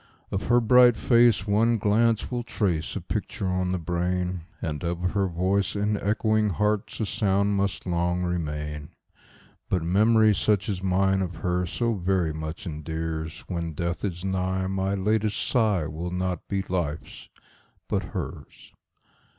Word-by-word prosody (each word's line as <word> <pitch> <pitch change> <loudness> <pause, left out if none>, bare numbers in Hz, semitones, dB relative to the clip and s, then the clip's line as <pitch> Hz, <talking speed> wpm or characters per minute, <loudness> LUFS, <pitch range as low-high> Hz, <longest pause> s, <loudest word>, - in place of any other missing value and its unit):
Of 95 - -2
her 120 +1 +5
bright 120 0 +6
face 120 -4 +4
one 115 +3 +3
glance 110 +3 +2
will 120 -1 -1
trace 95 -9 -1
a - - -3
picture 95 - -3
on 90 0 0
the 90 - 0
brain, 90 +1 -2
And 75 -2 -4
of 85 +1 -1
her 100 -2 +1
voice 95 +4 0
in 105 +1 +1
echoing 110 +1 +1
hearts 105 +2 -1
a - - +1
sound 100 0 +1
must 100 0 -1
long 90 0 0
remain; 75 -4 -3 0.8
But 90 -3 0
memory 110 +5 +4
such 100 0 +1
as 95 -3 -2
mine 95 +1 +2
of 90 -2 -3
her 90 0 +1
so 115 +6 0
very 90 -4 0
much 80 +3 -6
endears, 80 0 -4
When 85 -3 -4
death 85 +3 -3
is 90 -2 -3
nigh 95 0 -1
my 95 +1 -1
latest 105 +1 0
sigh 105 - +1
will 80 +3 -4
not 90 -1 -3
be 100 -1 -1
life's 85 -5 -4 0.6
but - - 0
hers. - - -7
95 Hz, 150 wpm, -26 LUFS, 85-105 Hz, 0.8 s, bright